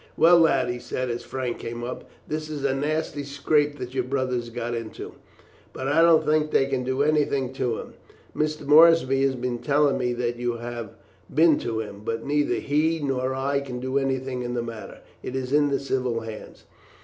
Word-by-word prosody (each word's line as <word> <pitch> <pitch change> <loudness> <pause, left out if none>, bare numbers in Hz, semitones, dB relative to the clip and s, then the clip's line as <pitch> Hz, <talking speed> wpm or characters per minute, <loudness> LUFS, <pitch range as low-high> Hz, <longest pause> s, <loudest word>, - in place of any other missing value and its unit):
"Well, 170 +1 +7
lad," 160 -6 +3
he 120 0 -3
said, 130 0 -3
as 120 - -4
Frank 130 -2 -4
came 120 +1 -6
up, 125 +1 -6 0.2
"this 155 0 -4
is 145 -2 -4
a 135 - +2
nasty 150 +1 -2
scrape 145 +1 +1
that 125 -1 -7
your 130 -1 0
brother 130 0 -1
has 120 -1 -2
got 120 0 -4
into; 115 -2 -6 0.6
but 130 - -4
I 145 +4 +3
don't 165 -1 +5
think 155 0 +2
they 135 - +3
can 135 -2 -2
do 130 +2 0
anything 145 -4 +1
to 125 -4 -1
him. - - -8 0.4
Mr. 155 -1 -1
Moorsby 150 -3 +6
has 135 -1 +2
been 125 -1 -3
telling 145 0 +2
me 125 -1 0
that 120 0 -2
you 120 0 -1
have 120 -2 -7 0.4
been 160 +1 +4
to 110 -1 -2
him; 105 -2 -8
but 115 +1 -3
neither 145 +1 +1
he 155 +3 +1
nor 130 -2 -1
I 140 +1 0
can 130 -3 -6
do 130 +2 0
anything 130 -1 -2
in 120 0 -3
the 120 - -1
matter 115 -2 -8 0.2
it - - -6
is 130 0 -3
in 145 0 +4
the 140 - 0
civil 130 -4 -1
hands. 110 -1 -9
130 Hz, 205 wpm, -25 LUFS, 120-145 Hz, 0.6 s, Well